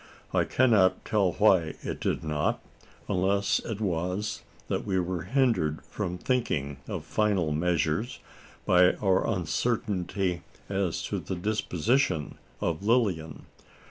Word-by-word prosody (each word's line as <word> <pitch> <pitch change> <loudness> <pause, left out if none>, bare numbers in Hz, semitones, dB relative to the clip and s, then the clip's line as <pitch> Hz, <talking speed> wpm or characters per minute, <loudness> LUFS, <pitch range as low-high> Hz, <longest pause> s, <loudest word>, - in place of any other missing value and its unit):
I - - +3
cannot 105 -8 +3
tell 100 -5 +2
why 95 -7 +3
it - - -4
did - - -1
not: 75 -2 0 0.5
unless 100 +1 +1
it 110 -3 -5
was 95 +2 -2 0.3
that - - -1
we 95 -2 0
were 90 -2 -2
hindered 115 - +1
from 90 -4 -4
thinking 85 - -1
of - - -5
final 100 -7 +1
measures, 85 +6 0 0.5
by 90 0 +5
our 95 -2 +1
uncertainty 95 -1 -1 0.3
as 95 -3 -1
to - - -2
the 95 - -4
disposition 95 - 0 0.2
of 85 0 -1
Lilian. 100 - 0
95 Hz, 120 wpm, -28 LUFS, 85-105 Hz, 0.5 s, by